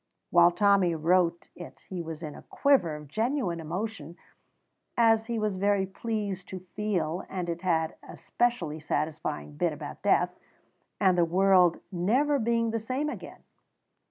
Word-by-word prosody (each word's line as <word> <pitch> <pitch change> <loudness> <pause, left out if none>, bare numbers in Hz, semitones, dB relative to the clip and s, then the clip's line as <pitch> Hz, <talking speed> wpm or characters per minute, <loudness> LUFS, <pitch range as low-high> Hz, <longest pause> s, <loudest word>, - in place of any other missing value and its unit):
While 175 0 +7
Tommy 190 -1 +3
wrote 170 +1 +1
it 175 - -11
he 185 -2 -4
was 165 0 -7
in 150 -2 -5
a - - -11
quiver 265 - +2
of 150 -1 -10
genuine 220 - -1
emotion, 170 0 -5 0.8
as 225 -1 +4
he 235 -1 -2
was 215 -3 -1
very 200 0 +2
pleased 200 -1 -4
to 185 -1 -8
feel, 185 -5 -1
and 180 -2 -3
it 170 0 -3
had 165 -3 +1
a - - -11
specially 185 -11 -1
satisfying 145 - -3
bit - - +1
about - - -8
death, - - +2 0.6
and 185 -1 +4
the 175 - +4
world 180 0 +4
never 250 +11 +2
being 230 0 +1
the 225 - -1
same 260 +7 -2
again. - - -10
185 Hz, 155 wpm, -28 LUFS, 170-220 Hz, 0.8 s, While